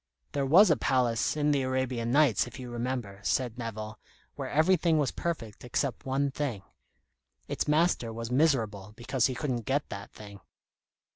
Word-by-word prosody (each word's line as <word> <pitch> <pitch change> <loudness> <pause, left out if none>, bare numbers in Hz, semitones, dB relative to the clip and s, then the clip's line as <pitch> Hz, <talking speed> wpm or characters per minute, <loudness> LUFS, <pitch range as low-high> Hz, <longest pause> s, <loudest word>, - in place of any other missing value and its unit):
'" 65 - -48
"There 140 -1 -1
was 180 +6 +7
a - - +5
palace 125 +1 +1
in 150 0 +2
the 140 -2 +2
'Arabian 130 -2 -1
Nights,' 135 -6 +4
if 125 - -10
you 125 -1 -7
remember," 120 -4 -4
said 125 +2 -1
Nevill, 110 -2 -6 0.4
"where - - -5
everything 165 +1 +3
was 145 -4 +1
perfect 120 -12 -4
except 130 +2 -2
one 135 +1 0
thing. 130 -9 -3 0.8
Its - - -2
master 150 -6 +2
was 115 +1 -6
miserable 115 -8 +1
because 125 +1 0
he 130 - -4
couldn't 125 -5 -2
get 140 +2 0
that 100 -1 -7
thing." 100 -2 -11
130 Hz, 165 wpm, -29 LUFS, 115-145 Hz, 0.8 s, was